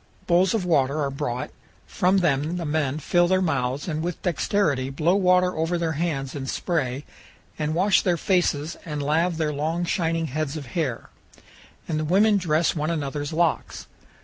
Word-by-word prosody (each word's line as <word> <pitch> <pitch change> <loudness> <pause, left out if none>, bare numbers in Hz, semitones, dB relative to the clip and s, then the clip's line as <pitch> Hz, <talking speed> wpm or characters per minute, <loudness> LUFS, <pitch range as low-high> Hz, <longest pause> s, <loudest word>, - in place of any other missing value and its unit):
Bowls 180 +3 +3
of 200 -5 -1
water 145 -3 +2
are 140 -2 -1
brought; 125 -2 -3 0.3
from 185 +2 +1
them 160 -1 +1
the 170 - -3
men 150 -2 0
fill 175 +3 +2
their 185 +1 +3
mouths 140 -5 -1
and 155 -2 -2
with 175 +1 -3
dexterity 160 -6 0
blow 155 +6 +1
water 180 -2 +3
over 165 +2 0
their 165 -1 -1
hands 150 -4 -2
in 135 -2 -5
spray 140 -5 -2 0.5
and 155 +1 -1
wash 190 +4 +4
their 175 -2 +1
faces 165 -4 0
and 150 -3 -4
lave 160 +4 +1
their 155 -2 -1
long 160 +4 -1
shining 165 -2 0
heads 155 +1 -3
of 145 - -7
hair; 145 -9 -2 0.8
and 155 -2 -1
the - - -1
women 205 +6 +4
dress 165 -3 +1
one 155 0 -1
another's 145 -2 -3
locks. 165 +1 -1
160 Hz, 175 wpm, -24 LUFS, 145-175 Hz, 0.8 s, wash